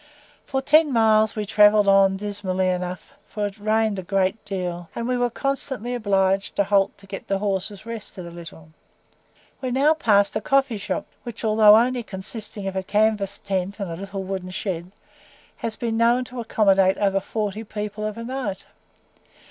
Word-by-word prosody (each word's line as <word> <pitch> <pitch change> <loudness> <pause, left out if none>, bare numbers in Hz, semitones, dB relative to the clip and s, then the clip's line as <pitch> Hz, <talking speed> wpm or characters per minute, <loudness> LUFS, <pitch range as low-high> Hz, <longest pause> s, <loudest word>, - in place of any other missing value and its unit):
For 265 -1 -2
ten 305 +1 +4
miles 220 -2 +3
we 210 -1 -2
travelled 210 0 +5
on 195 -1 +5
dismally 190 -2 -2
enough, 180 0 -4
for 210 -1 -3
it 205 +1 -6
rained 215 -1 +1
a - - -3
great 195 +3 0
deal, 180 -3 -4
and 235 - -3
we 250 - 0
were 245 0 +1
constantly 265 -2 -2
obliged 195 -4 +1
to 200 - +3
halt 195 0 +1
to 200 - -16
get 195 0 -8
the 195 - 0
horses 200 0 -3
rested 220 -5 -7
a 170 - -9
little. 165 -2 -11 0.9
We 260 - -2
now 275 +5 +3
passed 205 -9 +2
a 215 - 0
coffee 270 -2 +1
shop, 295 +8 -3 0.2
which 235 -2 -7
although 215 -1 +7
only 245 +2 +2
consisting 205 0 -5
of 190 - -4
a 190 - 0
canvas 205 0 +1
tent 195 +1 -3
and 180 -5 -4
little 195 +2 -6
wooden 190 -1 -5
shed, 185 -2 -4 0.7
has 225 -1 -4
been 230 -2 -2
known 235 +2 +3
to 250 0 -9
accommodate 195 -4 +3
above 195 -1 +1
forty 215 0 -3
people 210 0 -5
of 215 0 -3
a 230 - -5
night. 245 -5 -4
205 Hz, 175 wpm, -23 LUFS, 195-225 Hz, 0.9 s, although